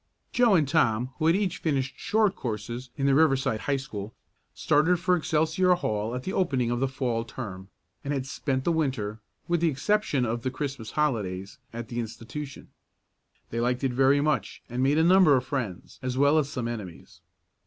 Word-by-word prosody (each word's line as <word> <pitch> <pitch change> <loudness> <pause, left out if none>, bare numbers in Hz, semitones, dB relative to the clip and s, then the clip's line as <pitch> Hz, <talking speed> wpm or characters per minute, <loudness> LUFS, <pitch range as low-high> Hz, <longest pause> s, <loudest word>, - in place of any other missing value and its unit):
Joe 240 -5 +5
and 155 -5 +3
Tom, 130 -5 +2
who 160 - +2
had 165 - +5
each 195 -2 -1
finished 135 -4 -1
short 210 -2 +2
courses 120 +2 -5
in 135 - 0
the 140 - +4
Riverside 135 -6 +3
High 140 +3 0
School, 110 -5 -7 0.4
started 165 +4 +3
for 180 +1 +3
Excelsior 165 +2 +2
Hall 110 -7 -2
at 125 - -4
the 190 - -4
opening 130 -10 +1
of 120 - 0
the 135 - +1
Fall 125 -3 -2
term, 100 -6 -8 0.3
and 140 - -3
had 135 -2 -1
spent 135 0 -2
the 170 - +1
Winter, 130 -10 -1 0.3
with 170 -1 +1
the 170 - +4
exception 150 -3 +1
of 115 +1 -2
the 130 - -1
Christmas 135 -4 -5
holidays, 105 -11 -2
at 115 -1 -7
the 120 - -3
institution. 120 +5 -7 0.8
They 115 - -2
liked 125 +2 0
it 130 -2 +1
very 135 +2 +4
much, 150 +1 -1
and 125 +1 -1
made 140 +3 +3
a 160 - +4
number 180 -5 +6
of 125 - -2
friends 115 -11 -4
as 130 0 -3
well 145 +3 +5
as 140 -2 -1
some 125 -4 -3
enemies. 105 -8 -8
135 Hz, 190 wpm, -27 LUFS, 120-155 Hz, 0.8 s, number